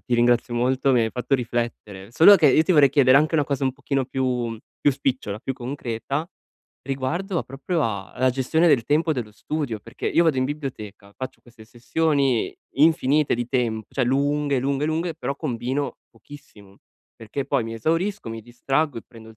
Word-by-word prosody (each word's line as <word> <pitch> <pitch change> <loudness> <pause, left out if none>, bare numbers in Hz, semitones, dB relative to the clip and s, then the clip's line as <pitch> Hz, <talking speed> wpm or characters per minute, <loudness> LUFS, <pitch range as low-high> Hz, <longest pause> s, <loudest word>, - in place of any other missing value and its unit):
ti 125 - -2
ringrazio 120 0 +2
molto 130 +3 +1
mi 125 - +4
hai 110 - -1
fatto 125 +2 -1
riflettere. 115 -5 -4
Solo 195 +9 +8
che 155 - +4
io 155 - +5
ti 185 - +1
vorrei 145 -3 +6
chiedere 135 -2 +5
anche 155 +2 +1
una 150 -2 +3
cosa 140 -1 -2
un 130 - +1
pochino 140 -1 -2
più 125 -3 -2 0.2
più 145 - +4
spicciola, 130 -6 -2
più 135 - -3
concreta 130 +2 -4 0.6
riguardo 155 +8 -2
proprio 145 +5 -3
a 100 -4 -3
alla 130 +1 +1
gestione 135 +7 +1
del 120 -6 +3
tempo 155 +2 +2
dello 120 -6 -4
studio, 120 +1 -4
perché 115 +4 -7
io 170 - +3
vado 155 -5 +2
in 130 - +2
biblioteca, 110 -9 -6
faccio 130 - -7
queste 115 -2 -16
sessioni 135 0 0 0.2
infinite 150 -1 +3
di 120 0 -3
temp 115 -5 -1
cioè 130 - +1
lunghe, 140 +1 +1
lunghe, 140 +3 -1
lunghe, 165 +2 -1
però 140 +2 -4
combino 130 -1 -3
pochissimo 105 -5 -16 0.4
perché 115 +5 -5
poi 135 -4 0
mi 115 0 -6
esaurisco, 165 - -1
mi 115 0 -6
distraggo 135 +4 -1
e - - -10
prendo 115 -2 -14
il 110 - -15
130 Hz, 185 wpm, -23 LUFS, 120-145 Hz, 0.6 s, Solo